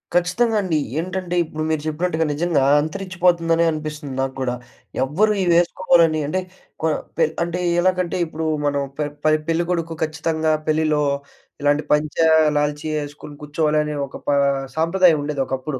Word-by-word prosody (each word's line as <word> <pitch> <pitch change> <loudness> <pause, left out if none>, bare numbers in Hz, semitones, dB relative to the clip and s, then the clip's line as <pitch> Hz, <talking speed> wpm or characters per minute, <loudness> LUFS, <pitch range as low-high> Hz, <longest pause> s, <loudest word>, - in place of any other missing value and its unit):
ఖచ్చితంగా 180 +7 +2
అండి. 180 -5 0 0.2
ఏంటంటే 180 +1 -3
ఇప్పుడు 155 -1 -5
మీరు 155 -2 0
చెప్పినట్టుగా 160 +1 0
నిజంగా 150 -1 +1 0.2
అంతరించిపోతుందనే 170 0 +1
అనిపిస్తుంది 150 -2 -5
నాకు 135 0 -2
గూడా. 125 -2 -1 0.5
ఎవ్వరు 195 +11 +2
ఇవేసుకోవాలని 170 -2 +3
అంటే 185 +6 -1 0.4
కొ 160 - +1 0.3
పే - - +4 0.2
అంటే 170 +1 -3
ఆహ్, 170 - +2
ఎలాగంటే 185 -1 +1
ఇప్పుడు 160 0 -5 0.2
మనం 140 -1 +1 0.2
పె 150 - 0 0.2
పె 155 - +4 0.2
పెళ్ళికొడుకు 165 0 -1
ఖచ్చితంగా 160 0 -1 0.2
పెళ్లిలో 155 -1 +2 0.6
ఇలాంటి 145 +1 +2
పంచా, 150 +2 +2 0.3
లాల్చీ 150 +1 -1
యేసుకొని 145 0 -7
కూర్చోవాలనే 150 0 0
ఒక 135 - -13
ప - - +1 0.5
సాంప్రదాయం 165 +1 +4
ఉండేదొకప్పుడు. 135 -1 -3
160 Hz, 135 wpm, -21 LUFS, 150-175 Hz, 0.6 s, పే